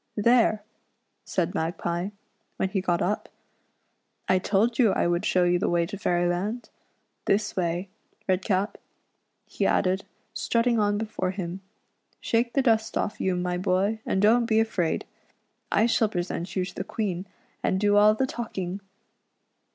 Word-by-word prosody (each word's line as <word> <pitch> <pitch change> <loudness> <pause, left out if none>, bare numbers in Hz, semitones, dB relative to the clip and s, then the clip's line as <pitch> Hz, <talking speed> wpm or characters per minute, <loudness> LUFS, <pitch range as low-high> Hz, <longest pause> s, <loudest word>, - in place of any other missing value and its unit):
"There! 220 -1 +3 0.3
" - - -49
said 180 -1 -1
Magpie, 170 +1 -2 0.5
when 190 - 0
he 190 -1 -1
got 175 -2 +1
up, 205 +3 -1 0.5
" - - -47
I 185 - +4
told 220 +6 +1
you 230 -5 +5
I - - +2
should 175 0 0
show 180 - +3
you 175 0 +3
the - - 0
way 170 -1 +2
to 200 +4 -6
Fairyland. 180 +5 -1 0.5
This 205 +2 +1
way, 175 +1 -1 0.4
Redcap," 190 +2 0 0.7
he - - -1
added, 190 +1 +1 0.3
strutting 235 0 +1
on 205 -1 +2
before 210 -4 -2
him, 185 -1 -5 0.6
"shake 235 +1 0
the 275 - +2
dust 220 -3 +2
off 210 - -2
you, 185 -1 +1
my 180 0 -1
boy, 195 +3 +1
and 190 - 0
don't 230 +2 +4
be 220 -1 +3
afraid. 195 -7 0 0.7
I 215 - +4
shall 225 -2 +2
present 175 -2 -4
you 185 -2 +1
to - - -8
the - - -4
Queen, 195 -4 -3 0.3
and 190 - +1
do 205 0 +3
all 210 +1 +6
the 265 - +1
talking." 195 -7 -4
195 Hz, 160 wpm, -26 LUFS, 180-220 Hz, 0.7 s, all